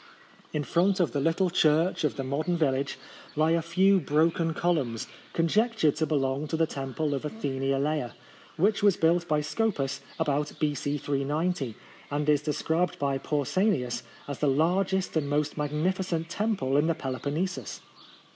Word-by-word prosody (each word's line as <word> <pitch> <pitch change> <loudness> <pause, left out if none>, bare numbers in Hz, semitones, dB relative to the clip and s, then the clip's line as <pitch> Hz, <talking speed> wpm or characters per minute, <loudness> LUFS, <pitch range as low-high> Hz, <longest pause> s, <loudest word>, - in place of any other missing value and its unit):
In 150 - -1
front 185 +6 +2
of 175 - +2
the 145 - -1
little 165 +5 +1
church 160 +1 +3
of 150 - +1
the 135 - -3
modern 155 +7 -1
village 140 -3 0 0.4
lie 155 +2 +3
a 165 0 +3
few 190 +4 +3
broken 165 +1 +1
columns, 140 -10 0 0.3
conjectured 200 - +2
to 160 - +1
belong 140 0 0
to 160 - -2
the 165 - +3
temple 140 +1 -3
of 140 - -3
Athene 135 -6 -2
Alea, 140 -2 -1 0.4
which 200 +5 +2
was 200 -2 +4
built 170 +1 +2
by 150 -1 +2
Scopas 150 -5 -1 0.2
about 150 -2 0
B.C. 145 -1 0
390, 145 -1 -1 0.3
and 145 +1 -1
is 150 -1 +4
described 160 +3 0
by 140 -1 0
Pausanias 145 - 0 0.3
as 140 -2 -5
the 150 - +2
largest 180 +7 +1
and 145 -3 0
most 150 0 0
magnificent 165 +3 -1
temple 190 -11 0
in 150 +2 +3
the 165 - +1
Peloponnesus. 140 - -3
155 Hz, 155 wpm, -28 LUFS, 140-175 Hz, 0.4 s, was